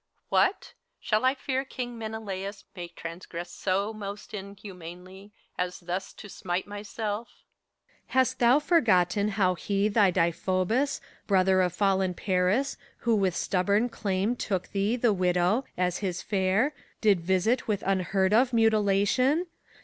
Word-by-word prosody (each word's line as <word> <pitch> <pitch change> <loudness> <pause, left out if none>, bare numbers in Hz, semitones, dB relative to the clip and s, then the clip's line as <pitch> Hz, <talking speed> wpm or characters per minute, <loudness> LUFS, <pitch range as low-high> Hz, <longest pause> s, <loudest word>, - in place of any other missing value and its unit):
What! 380 - +1 0.3
Shall 215 +1 0
I 260 +1 +3
fear 265 0 -2
King 245 -2 -6
Menelaus 210 -3 -5
may 175 -2 -6
transgress 170 0 -8
So 200 +3 -1
most 205 0 -8
inhumanly, 190 -1 -9 0.3
as 180 0 -2
thus 180 +2 -4
to - - -11
smite 185 -2 -3
myself? 210 +2 -4 0.8
PHOBKYAS. - - -15
Hast 260 -1 +2
thou 245 +3 +5
forgotten 210 - +3
how 195 -3 +2
he 200 +3 0
thy 205 -2 +4
Deiphobus, 185 - 0 0.3
Brother 190 -1 +4
of 180 -2 +1
fallen 190 -1 +1
Paris, 190 +10 +1 0.2
who 235 -1 +2
with 190 -4 +1
stubborn 200 +5 +1
claim 200 +2 -1
Took 190 -6 -3
thee, 200 +3 0
the 235 -3 +2
widow, 180 +6 +1
as 180 -1 0
his 190 -3 -3
fere, 200 +8 +1 0.3
did 205 -4 +4
visit 190 +8 +1
with 205 -2 -1
Unheard 190 0 +1
of 245 +3 +4
mutilation? 225 - +3
200 Hz, 135 wpm, -27 LUFS, 185-220 Hz, 0.8 s, thou